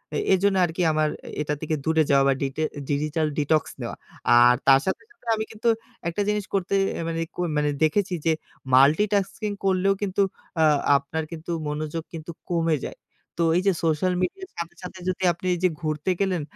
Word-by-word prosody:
এ -, -, +1 dB, 0.2 s
এজন্য 195 Hz, +1 st, +3 dB
আরকি 170 Hz, +2 st, -4 dB
আমার 155 Hz, 0 st, +1 dB, 0.3 s
এটা 150 Hz, 0 st, -1 dB
থেকে 155 Hz, 0 st, -1 dB
দূরে 160 Hz, 0 st, +3 dB
যাওয়া 140 Hz, -1 st, +5 dB
বা 135 Hz, -, +4 dB
ডিটে 140 Hz, +3 st, -1 dB
এ -, -, -4 dB
ডিজিটাল 155 Hz, +2 st, 0 dB
ডিটক্স 150 Hz, +1 st, +1 dB
নেওয়া। -, -, -4 dB, 0.4 s
আর 120 Hz, 0 st, +7 dB
তার 135 Hz, -1 st, +8 dB
সাথে, 190 Hz, -, -1 dB
সাথে 245 Hz, -, -24 dB
আমি 220 Hz, -, -2 dB
কিন্তু 225 Hz, +2 st, 0 dB, 0.4 s
একটা 170 Hz, +5 st, -1 dB
জিনিস 210 Hz, -1 st, 0 dB
করতে 195 Hz, -1 st, -1 dB, 0.3 s
আ -, -, -2 dB
মানে 165 Hz, 0 st, -2 dB
ক -, -, -24 dB, 0.2 s
মানে 150 Hz, 0 st, +2 dB
দেখেছি, 185 Hz, +5 st, +2 dB
যে 165 Hz, -, +4 dB, 0.4 s
মাল্টিটাস্কিং 200 Hz, -, +3 dB
করলেও 190 Hz, +1 st, +3 dB
কিন্তু 200 Hz, 0 st, 0 dB, 0.4 s
আ -, -, +6 dB, 0.3 s
আপনার 155 Hz, +3 st, -4 dB
কিন্তু 165 Hz, +1 st, -6 dB, 0.2 s
মনোযোগ 155 Hz, +2 st, -3 dB
কিন্তু 165 Hz, 0 st, -6 dB, 0.2 s
কমে 165 Hz, -2 st, +2 dB
যায়। -, -, -6 dB, 0.4 s
তো -, -, 0 dB, 0.2 s
এইযে 195 Hz, +2 st, +3 dB
সোশ্যাল 165 Hz, +3 st, +1 dB
মিডিয়ার 380 Hz, -, -3 dB
সাথে, 170 Hz, 0 st, -5 dB
সাথে 185 Hz, +1 st, -8 dB
যদি 185 Hz, +1 st, -3 dB
আপনি 170 Hz, +2 st, -12 dB
ওইযে 180 Hz, +1 st, +2 dB
ঘুরতে 155 Hz, +3 st, -1 dB
গেলেন, 190 Hz, -4 st, +1 dB
165 Hz, 180 wpm, -25 LUFS, 155-190 Hz, 0.4 s, তার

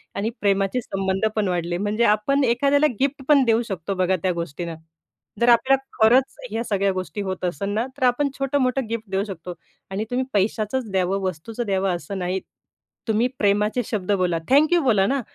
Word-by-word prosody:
आणि 205 Hz, +3 st, -1 dB
प्रेमाचे 200 Hz, +4 st, +1 dB
संबंध 195 Hz, -1 st, -1 dB
पण 210 Hz, -3 st, +1 dB
वाढले. 175 Hz, -1 st, -1 dB
म्हणजे 210 Hz, +4 st, 0 dB
आपण 225 Hz, +7 st, +2 dB
एखाद्याला 280 Hz, +5 st, +3 dB
गिफ्ट 275 Hz, 0 st, 0 dB
पण 285 Hz, -3 st, +6 dB
देऊ 230 Hz, 0 st, +3 dB
शकतो 190 Hz, 0 st, -3 dB
बघा 185 Hz, 0 st, +2 dB
त्या 185 Hz, -, +2 dB
गोष्टींना. 170 Hz, 0 st, -5 dB, 0.7 s
जर 240 Hz, -, +5 dB
आपल्या 250 Hz, +3 st, +5 dB, 0.2 s
खरंच 250 Hz, +4 st, +4 dB
ह्या 225 Hz, +2 st, -2 dB
सगळ्या 200 Hz, -3 st, +1 dB
गोष्टी 185 Hz, +1 st, -4 dB
होत 190 Hz, -1 st, -4 dB
असतं 195 Hz, +4 st, -2 dB
ना, 225 Hz, +3 st, 0 dB
तर -, -, -3 dB
आपण 280 Hz, +4 st, +1 dB
छोटं-मोठं 270 Hz, -2 st, 0 dB
गिफ्ट 225 Hz, -3 st, -4 dB
देऊ 195 Hz, +1 st, +1 dB
शकतो. 180 Hz, -2 st, -7 dB, 0.4 s
आणि 200 Hz, +3 st, -2 dB
तुम्ही 255 Hz, +1 st, 0 dB
पैशाचंच 215 Hz, +4 st, 0 dB
द्यावं, 190 Hz, +1 st, +1 dB
वस्तूचं 190 Hz, +7 st, -4 dB
द्यावं 190 Hz, -2 st, 0 dB
असं 175 Hz, +4 st, -6 dB
नाही. 180 Hz, +1 st, -1 dB, 0.7 s
तुम्ही 225 Hz, +2 st, +2 dB
प्रेमाचे 210 Hz, +4 st, +2 dB
शब्द 205 Hz, -3 st, -2 dB
बोला, 180 Hz, -4 st, +1 dB
थँक्यू 310 Hz, +5 st, +5 dB
बोला 210 Hz, -7 st, +3 dB
ना. 275 Hz, -1 st, 0 dB
210 Hz, 175 wpm, -23 LUFS, 190-245 Hz, 0.7 s, पण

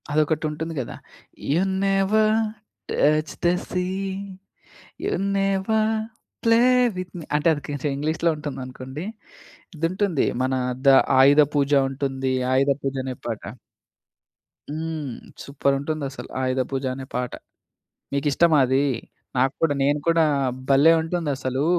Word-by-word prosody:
అదొకటి 155 Hz, +1 st, +1 dB
ఉంటుంది 160 Hz, +2 st, -5 dB
కదా! 120 Hz, -, -7 dB, 0.6 s
'You 165 Hz, +5 st, +3 dB, 0.2 s
never 205 Hz, +3 st, +3 dB, 0.6 s
touch 155 Hz, +1 st, +2 dB
the 175 Hz, -, +5 dB, 0.2 s
sea, 180 Hz, -1 st, 0 dB, 1.2 s
you -, -, 0 dB, 0.2 s
never 195 Hz, +3 st, +1 dB, 0.5 s
play 230 Hz, 0 st, +5 dB, 0.4 s
with 185 Hz, -1 st, -5 dB
me' 165 Hz, -, -8 dB
అంటే 150 Hz, +3 st, +1 dB
అది 150 Hz, -, -3 dB
కొంచెం 145 Hz, 0 st, -2 dB
ఇంగ్లీషులో 160 Hz, +3 st, 0 dB
ఉంటుందనుకోండి.ఇదుంటుంది 155 Hz, -, -4 dB, 0.2 s
మన 130 Hz, +1 st, 0 dB, 0.3 s
ద -, -, +7 dB, 0.3 s
ఆయుధ 140 Hz, +3 st, +7 dB
పూజ 145 Hz, 0 st, +1 dB, 0.2 s
ఉంటుంది. 135 Hz, -1 st, -2 dB, 0.2 s
ఆయుధ 135 Hz, +2 st, +3 dB
పూజ 135 Hz, 0 st, -2 dB
అనే 130 Hz, -1 st, -4 dB
పాట. 115 Hz, -3 st, -4 dB, 1.3 s
హ్మ్. 155 Hz, -3 st, -4 dB, 0.3 s
సూపర్ 140 Hz, 0 st, 0 dB
ఉంటుందసలు! 145 Hz, -2 st, -4 dB
ఆయుధ 130 Hz, 0 st, 0 dB
పూజ 135 Hz, 0 st, -2 dB
అనే 135 Hz, 0 st, -7 dB
పాట. 125 Hz, 0 st, -2 dB, 0.8 s
మీకిష్టమా 150 Hz, +3 st, +3 dB
అది? 130 Hz, +2 st, +2 dB, 0.5 s
నాకు 130 Hz, +2 st, +2 dB
కూడా. 160 Hz, -3 st, +3 dB
నేను 145 Hz, +2 st, +2 dB
కూడా 165 Hz, -1 st, +4 dB, 0.5 s
భలే! 140 Hz, +4 st, +6 dB
ఉంటుందసలూ. 145 Hz, -5 st, -2 dB
150 Hz, 115 wpm, -23 LUFS, 135-170 Hz, 1.3 s, ద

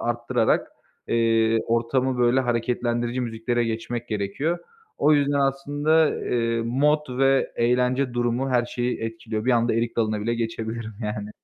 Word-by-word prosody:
arttırarak, 120 Hz, 0 st, 0 dB, 0.4 s
eee, 115 Hz, -1 st, +3 dB
ortamı, 125 Hz, +2 st, 0 dB
böyle, 120 Hz, +2 st, +3 dB
hareketlendirici 120 Hz, 0 st, -1 dB
müziklere 120 Hz, 0 st, -1 dB
geçmek 115 Hz, +1 st, -4 dB
gerekiyor. 110 Hz, -, -2 dB, 0.4 s
O 155 Hz, -, +4 dB
yüzden, 145 Hz, 0 st, +2 dB
aslında, 145 Hz, +3 st, +2 dB
eee, 115 Hz, -1 st, 0 dB
mod 135 Hz, +2 st, +1 dB
ve 135 Hz, 0 st, +3 dB
eğlence 125 Hz, +2 st, +1 dB
durumu 120 Hz, +2 st, 0 dB
her 120 Hz, -2 st, +2 dB
şeyi 120 Hz, +1 st, -2 dB
etkiliyor. 115 Hz, -1 st, -4 dB
Bir 130 Hz, -, +2 dB
anda 120 Hz, -1 st, +2 dB
erik 115 Hz, +1 st, -1 dB
dalına 110 Hz, -2 st, 0 dB
bile 115 Hz, +2 st, -1 dB
geçebilirim 115 Hz, -1 st, -4 dB
yani. 105 Hz, 0 st, -4 dB
120 Hz, 135 wpm, -24 LUFS, 115-130 Hz, 0.4 s, O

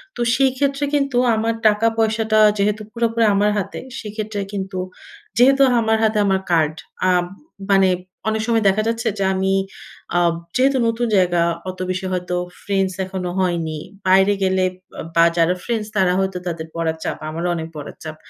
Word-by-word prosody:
তো -, -, -4 dB
সেইক্ষেত্রে 275 Hz, +1 st, +1 dB
কিন্তু 275 Hz, -3 st, 0 dB, 0.2 s
আমার 225 Hz, +1 st, 0 dB
টাকা 215 Hz, +2 st, +3 dB
পয়সাটা 220 Hz, -1 st, +2 dB, 0.2 s
যেহেতু 210 Hz, +1 st, 0 dB
পুরোপুরি 230 Hz, 0 st, 0 dB
আমার 205 Hz, +1 st, +3 dB
হাতে, 195 Hz, -, -3 dB, 0.2 s
সেক্ষেত্রে 215 Hz, -1 st, -5 dB
কিন্তু 190 Hz, -1 st, -4 dB, 0.6 s
যেহেতু 270 Hz, +3 st, +5 dB, 0.2 s
আমার 220 Hz, 0 st, +2 dB
হাতে 215 Hz, -1 st, +2 dB
আমার 190 Hz, -1 st, +1 dB
কার্ড। 155 Hz, -2 st, +3 dB, 0.4 s
আম 180 Hz, -1 st, +3 dB, 0.5 s
মানে 195 Hz, -1 st, +5 dB, 0.4 s
অনেক 220 Hz, 0 st, -1 dB
সময় 230 Hz, -2 st, +2 dB
দেখা 200 Hz, +3 st, +1 dB
যাচ্ছে 230 Hz, +1 st, -1 dB
যে, 195 Hz, -, 0 dB
আমি, 190 Hz, 0 st, 0 dB, 0.6 s
আব 170 Hz, -1 st, +3 dB, 0.2 s
যেহেতু 265 Hz, +1 st, +3 dB
নতুন 230 Hz, +1 st, 0 dB
জায়গা। 175 Hz, -3 st, +3 dB, 0.3 s
অত 185 Hz, 0 st, -8 dB
বেশি 185 Hz, +1 st, -2 dB
হয়তো 180 Hz, -1 st, -2 dB, 0.3 s
ফ্রেন্ডস 195 Hz, -1 st, 0 dB
এখনো 185 Hz, -1 st, -4 dB
হয়নি। 170 Hz, -4 st, -1 dB, 0.3 s
বাইরে 190 Hz, +2 st, +5 dB
গেলে 190 Hz, 0 st, +2 dB, 0.3 s
বা -, -, -8 dB
বা, 170 Hz, -, +6 dB
যারা 170 Hz, +1 st, +3 dB
ফ্রেন্ডস, 225 Hz, -3 st, -2 dB
তারা 185 Hz, -2 st, +3 dB
হয়তো 190 Hz, -1 st, -1 dB
তাদের 165 Hz, -2 st, -4 dB
পড়ার 160 Hz, -1 st, -1 dB
চাপ। -, -, -3 dB
আমারও 170 Hz, +3 st, -3 dB
অনেক 160 Hz, -1 st, -4 dB
পড়ার 150 Hz, -2 st, -8 dB
চাপ। 155 Hz, -1 st, -6 dB
195 Hz, 165 wpm, -20 LUFS, 180-225 Hz, 0.6 s, বা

